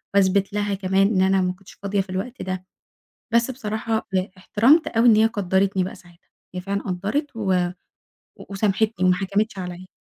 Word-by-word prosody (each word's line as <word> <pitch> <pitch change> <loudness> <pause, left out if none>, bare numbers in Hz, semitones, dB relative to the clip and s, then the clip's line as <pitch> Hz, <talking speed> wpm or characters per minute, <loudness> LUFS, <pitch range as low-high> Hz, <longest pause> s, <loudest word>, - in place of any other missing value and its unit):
واثبت 195 0 +3
لها 205 -1 -1
كمان 195 0 +2
إن 195 -4 +1
أنا 190 0 +3
ما 180 0 0
كُنتش 190 +1 -16
فاضية 200 0 -1
في 190 - -10
الوقت 195 +7 -4
ده، 185 0 -4 0.7
بس 235 +2 +3
بصراحة 220 -2 -3
ب 190 - +1 0.2
احترمت 245 - +3
أوي 230 +1 +2
إن 215 - +7
هي 220 - +5
قدّرتني 195 -3 +1
بقى 185 - -6
ساعتها، 175 -1 -20 0.2
هي 180 - -3
فعلًا 200 +2 -3
قدّرت 210 - -3
و 200 -4 0 0.8
و - - -11
وسامحتني، 205 0 0
وما 180 - +5
حكمتش 200 +2 -1
عليَّ. 180 0 -6
195 Hz, 180 wpm, -23 LUFS, 185-220 Hz, 0.8 s, إن